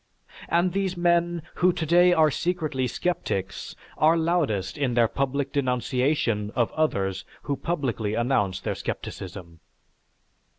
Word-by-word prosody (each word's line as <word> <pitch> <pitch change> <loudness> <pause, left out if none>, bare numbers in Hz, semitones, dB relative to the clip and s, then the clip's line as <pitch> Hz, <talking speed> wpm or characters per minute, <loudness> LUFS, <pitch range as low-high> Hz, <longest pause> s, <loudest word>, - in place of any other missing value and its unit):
And 175 +2 +2
these 190 -2 -1
men 170 -1 +2 0.2
who 180 +1 +6
today 175 +1 +4
are 160 -3 +4
secretly 155 -6 -1
sceptics, 125 - -3 0.2
are 160 +2 +5
loudest 160 - 0
in 130 -4 -1
their 120 -1 +5
public 140 +2 -2
denunciation 125 -4 0
of 120 -3 +1
others 100 -12 0 0.2
who 145 - -1
publicly 125 - -2
announce 120 -6 +1
their - - -2
scepticism. 85 -3 -6
140 Hz, 120 wpm, -25 LUFS, 115-170 Hz, 0.2 s, who